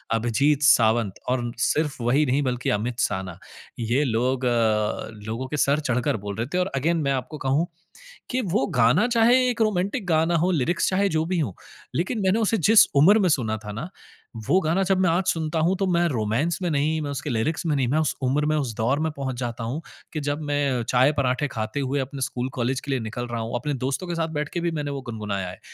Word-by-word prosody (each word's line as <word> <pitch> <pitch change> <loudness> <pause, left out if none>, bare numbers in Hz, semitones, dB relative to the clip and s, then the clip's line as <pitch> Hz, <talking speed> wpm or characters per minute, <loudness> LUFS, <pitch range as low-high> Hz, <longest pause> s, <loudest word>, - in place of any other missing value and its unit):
अभिजीत 135 +6 +1
सावंत 115 -6 +4
और 130 0 +1
उन 120 - -3
सिर्फ़ 150 +3 0
वही 135 +6 +3
नहीं 130 +3 +2
बल्कि 125 -1 -1
अमित 115 +4 -2
साना। 95 -6 -2 0.4
ये 120 +5 +1
लोग 125 +2 0
अ, 110 -3 +1 0.2
लोगों 115 +4 -4
के 150 - -4
सर 140 +1 +2
चढ़कर 125 -2 0
बोल 100 0 -6
रहे 115 - -2
थे - - +1
और 180 - +1
अगेन 165 +6 +1
मैं 140 - +1
आपको 135 +4 -4
कहूँ 140 +5 +1 0.6
कि 255 +1 0
वो 175 - 0
गाना 125 - +4
चाहे 235 +1 +4
एक 235 -2 -2
रोमांटिक 205 +1 0
गाना 165 0 +2
हो, 180 +3 +2
लिरिक्स 170 +2 +1
चाहे 195 +1 +1
जो 160 -1 0
भी 180 +1 -1
हों, 120 - -1 0.4
लेकिन 190 +7 -1
मैंने 190 +4 +3
उसे 225 0 +1
जिस 215 +5 +6
उम्र 190 +10 +6
में 185 - +3
सुना 115 -8 0
था 105 - -5
ना, 120 - -6 0.6
वो 185 - +4
गाना 165 +4 +1
जब 190 0 +2
मैं 185 - +3
आज 175 +3 +2
सुनता 160 -1 0
हूँ 170 +4 +2
तो 195 - 0
मैं 175 -1 +2
रोमांस 125 +7 0
में 180 - 0
नहीं, 150 +2 +1
मैं 145 -1 -3
उसके 140 +1 -4
लिरिक्स 140 +8 -1
में 155 -3 +1
नहीं, 135 -3 +1
मैं 145 +6 +1
उस 155 - +1
उम्र 140 +4 +1
में, 155 0 +1
उस 135 -6 -2
दौर 120 +6 0
में 160 0 -1
पहुँच 135 -2 -3
जाता 120 -2 -4
हूँ 125 +8 -3 0.3
कि 155 - -2
जब 145 +1 -2
मैं 145 -1 +1
अ, - - -2
चाय-पराठे 130 +2 +2
खाते 110 +3 -4
हुए 140 +1 -1
अपने 135 +1 -5
स्कूल-कॉलेज 130 0 -2
के 140 - -5
लिए 135 - +1
निकल 115 +2 -5
रहा 120 -1 -3
हूँ। 115 +2 -4
अपने 145 +5 -2
दोस्तों 135 +7 -2
के 175 - -3
साथ 165 -1 -1
बैठ 150 0 -3
के 175 - -1
भी 170 0 0
मैंने 145 -3 -3
वो 140 -1 -4
गुनगुनाया 105 -6 -4
है। 90 - -10
140 Hz, 230 wpm, -24 LUFS, 120-165 Hz, 0.6 s, जिस